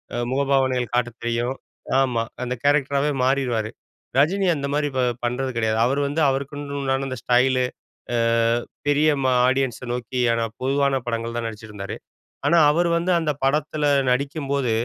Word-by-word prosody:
அ - - -2
முகபாவனைகள் 130 -3 +1
காட்டத் 120 -1 -1
தெரியும். 120 +2 -1 0.4
ஆமா, 125 -4 +1 0.2
அந்த 125 0 -2
கேரக்டராவே 145 0 +2
மாறிருவாரு. 125 -5 +1 0.5
ரஜினி 185 +8 +3
அந்த 140 -1 -3
மாரி 150 0 +1
ப - - +1 0.2
பண்றது 125 +2 -1
கிடையாது. 110 -1 +1
அவரு 135 +3 +1
வந்து, 145 +3 -1
அவருக்குன்னு 140 +1 -4
உண்டான 135 0 0
அந்த 130 - -4
ஸ்டைலு. 125 +1 +3 0.5
அ - - +2 0.7
பெரிய 145 +2 +4
ம - - -1 0.2
ஆடியன்ஸ 130 -2 0
நோக்கிய 120 -1 0
பொதுவான 135 0 +1
படங்கள் 115 0 -3
தான் 120 - -2
நடிச்சுட்டிருந்தாரு. 105 -3 -7 0.5
ஆனா 170 - +4
அவரு 170 +3 +1
வந்து 170 +2 0
அந்த 155 -2 0
படத்துல 150 +2 0 0.3
நடிக்கும் 140 +2 -2
போது, 140 -4 +1
135 Hz, 145 wpm, -23 LUFS, 120-140 Hz, 0.7 s, பெரிய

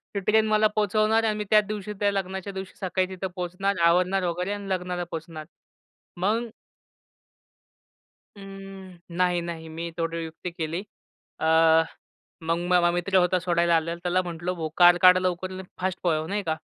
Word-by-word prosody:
ती 200 - +1
ट्रेन 215 +3 +2
मला 215 0 +4
पोहचवणार 215 +2 +2
आणि 215 -1 0
मी 210 - -2
त्याच 210 -1 +5
दिवशी, 210 -1 -5
त्या 205 -1 +2
लग्नाच्या 190 0 -4
दिवशी 190 0 -7
सकाळी 185 -1 0
तिथं 190 0 -4
पोहचणार, 185 +2 -2
आवरणार 180 +3 +3
वगैरे 180 +3 -2
अन् 200 -1 -6
लग्नाला 180 -1 -2
पोहचणार. 160 -1 -7 0.7
मग 220 +6 0 1.9
अं, 195 -2 -10 0.2
नाही, 180 -1 +2
नाही. 165 -1 -6
मी 165 +1 -5
थोडी 165 0 -2
युक्ती 165 +2 -7
केली. 165 +1 -4 0.6
अ, - - -2 1.0
मग 165 +1 +1
माझा 175 -1 +4
मित्र 175 +2 +1
होता 180 0 +3
सोडायला 170 -1 +2
आलेला, 165 +1 0
त्याला 180 +1 +1
म्हटलं, 175 0 -4
"भो 160 -2 -3
कार 175 0 +7
काढ 185 0 +8
लवकर 185 0 -2
आणि 185 0 -7 0.2
फास्ट 185 0 -1
पळव," 160 -3 +1
नाही 205 +1 -2
का 160 -3 -1
185 Hz, 160 wpm, -25 LUFS, 170-195 Hz, 1.9 s, काढ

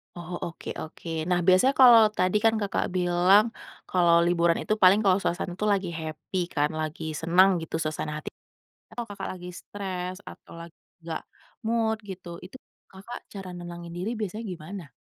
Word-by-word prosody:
Oh, 175 0 -8
oke 170 - -8
oke. 160 +2 -9 0.2
Nah, 180 -1 +3
biasanya 185 +9 +5
kalau 240 -3 +9 0.2
tadi 185 +3 +2
kan 225 - +5
Kakak 200 -2 0
bilang 180 +3 +4 0.4
kalau 175 -2 +4
liburan 170 -1 +3
itu - - 0
paling 185 +3 +7
kalau 190 -2 +4
suasana 175 0 -2
itu 210 - -1
lagi 190 -3 -1
happy 160 +2 -6 0.2
kan, 145 0 +2
lagi 155 +1 -4 0.2
senang 180 +4 +5
gitu 160 - -5
suasana 155 0 -3
hati, - - -6 0.6
kalau 240 - -4
Kakak 205 - -6
lagi 180 -1 -9
stres 185 -2 -5
atau - - -14
lagi 170 0 -12 0.3
gak 160 -1 -3 0.4
mood 225 -1 +1
gitu, 180 -2 -8 0.2
itu 195 - -11 0.3
Kakak 195 +6 -9
cara 195 -2 -7
nenangin 175 -1 -8
diri 190 +6 -2
biasanya 215 +1 -4
gimana? 175 -1 -8
180 Hz, 165 wpm, -26 LUFS, 170-200 Hz, 0.6 s, kalau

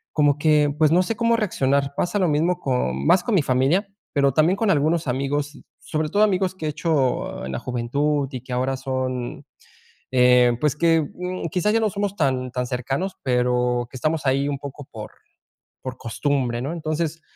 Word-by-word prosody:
como 145 -1 +3
que, 150 -1 +3
pues, 155 -1 +4
no 180 +2 +5
sé 225 +4 -2
cómo 230 0 +3
reaccionar. 140 - 0
Pasa 205 +4 0
lo 180 -4 +2
mismo 170 +4 +1
con 70 - -1
más 180 -1 +5
con 230 - 0
mi 175 - +4
familia, 140 +11 +2 0.3
pero 140 -2 +3
también 160 +6 +3
con 215 -3 +2
algunos 155 +1 +1
amigos, 140 +3 -2 0.2
sobre 155 0 -2
todo 205 +1 +3
amigos 190 -2 +1
que 160 -4 -4
he - - 0
hecho 145 - -1
en 65 - -5
la - - -2
juventud 140 +4 -1
y 130 - -6
que 125 0 -7
ahora 130 +1 0
son, 130 -2 -4 0.7
eh, 125 -1 +5
pues 150 -2 +1
que, 165 +1 +3
mm, 180 -1 -4
quizás 185 +5 +1
ya 225 - +3
no 215 -2 +1
somos 200 0 -2
tan 130 -6 0
tan 125 -1 -2
cercanos, 135 +10 -3
pero 125 -1 +1
que 130 - -10
estamos 155 +3 -1
ahí 135 +2 +2
un 140 -2 -2
poco 140 0 -9
por 110 -2 -8 0.7
por 130 -1 -6
costumbre, 125 0 -1
¿no? 140 - -3
Entonces, 160 0 -3
145 Hz, 190 wpm, -23 LUFS, 130-170 Hz, 0.7 s, no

